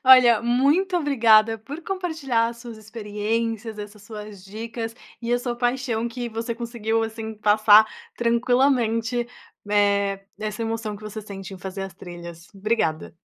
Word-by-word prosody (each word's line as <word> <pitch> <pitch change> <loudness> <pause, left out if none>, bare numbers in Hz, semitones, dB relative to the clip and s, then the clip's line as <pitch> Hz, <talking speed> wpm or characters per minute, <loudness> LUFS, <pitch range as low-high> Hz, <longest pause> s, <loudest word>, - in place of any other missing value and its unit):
Olha, 250 -4 +8
muito 285 +10 +3
obrigada 225 -7 +4
por 285 +10 -8
compartilhar 300 -12 -1
suas 235 -1 -9
experiências, 220 +1 -3
essas 205 0 -8
suas 210 -3 -9
dicas, 225 +2 -5 0.3
e 235 0 -2
a 245 - +3
sua 245 -1 -3
paixão 245 -2 0
que 240 0 -4
você 230 +1 -3
conseguiu 225 -1 -1
assim, 220 0 -5
passar 215 +1 +6 0.3
tranquilamente, 240 -1 +2 0.4
eh, 200 -1 +2
essa 215 +1 -3
emoção 225 -2 -3
que 210 - -15
você 215 +1 -6
sente 195 -2 -8
em - - -11
fazer 190 +1 -5
as 195 - -7
trilhas, 170 -2 -10
obrigada. 195 -7 -1
225 Hz, 140 wpm, -24 LUFS, 210-240 Hz, 0.4 s, Olha